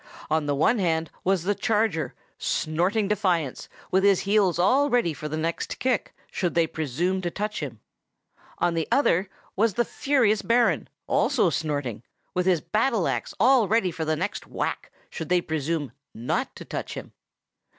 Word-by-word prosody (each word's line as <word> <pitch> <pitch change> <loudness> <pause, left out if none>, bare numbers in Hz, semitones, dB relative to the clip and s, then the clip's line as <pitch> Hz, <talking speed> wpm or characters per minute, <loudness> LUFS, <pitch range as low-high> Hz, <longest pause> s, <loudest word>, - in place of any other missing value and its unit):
On 155 -1 +1
the 145 - +1
one 210 - +3
hand 165 -3 0
was 190 -2 +1
the 205 +3 +1
charger, 210 -5 0 0.2
snorting 180 +7 0
defiance, 180 - 0 0.2
and - - -24
with 190 +1 +3
his 200 -2 +4
heels 200 -3 +2
all 260 +11 +3
ready 240 - +2
for 150 +1 -6
the 155 - -3
next 165 +1 -2
kick, 255 -3 -1 0.2
should 175 -3 -1
they 170 -1 +4
presume 160 +5 -1
to 175 - -1
touch 210 +4 -3
him; 125 -8 -6 0.8
on 175 -1 +1
the 165 -1 -1
other 195 -9 +3 0.3
was 210 -1 +2
the 240 - +2
furious 240 -8 +2
Baron, 235 +1 +2 0.2
also 235 - +2
snorting, 145 -7 -2
and - - -22 0.3
with 180 0 0
his 175 -4 +3
battle 220 -3 +1
axe - - -2
all 250 -4 +5
ready 215 -4 +2
for 165 -1 -4
the 155 0 0
next 185 +6 -4
whack, - - -3 0.2
should 160 - -6
they 180 0 +4
presume 160 -2 -2 0.2
not 115 +3 -2
to - - -9
touch - - -5
him. - - -8
180 Hz, 175 wpm, -25 LUFS, 160-215 Hz, 0.8 s, all